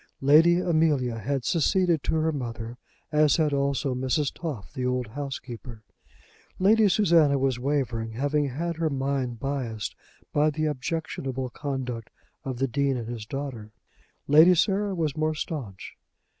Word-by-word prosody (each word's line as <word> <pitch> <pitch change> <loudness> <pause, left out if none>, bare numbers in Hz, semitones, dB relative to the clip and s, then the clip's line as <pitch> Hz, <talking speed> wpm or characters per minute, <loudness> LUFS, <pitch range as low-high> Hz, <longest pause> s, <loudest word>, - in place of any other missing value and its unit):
Lady 160 +5 +6
Amelia 155 -9 +1
had 135 +3 -2
seceded 170 0 +2
to - - -1
her 160 0 +1
mother, 120 -4 -5 0.4
as 150 -2 +4
had 155 -3 +1
also 140 0 0
Mrs. 130 +3 0
Toff, 150 - -6
the 130 - -4
old 125 0 0
housekeeper. 125 -3 -7 0.7
Lady 210 +2 +4
Susanna 165 -7 +4
was 130 -2 0
wavering, 120 -5 -1
having 145 +4 0
had 165 +5 -3
her 165 -1 0
mind 135 -3 -2
biased 125 -6 -3 0.4
by 150 +1 +3
the 155 +1 -2
objectionable 135 -3 -3
conduct 130 -6 -4 0.3
of 130 -4 -4
the 135 +2 +1
Dean 135 +1 0
and 115 -2 -5
his 115 -3 -6
daughter. 135 -6 -5 0.6
Lady 160 +5 +7
Sarah 200 +2 +1
was 155 -4 -1
more 155 0 0
staunch. 130 - -6
140 Hz, 145 wpm, -26 LUFS, 125-155 Hz, 0.7 s, Lady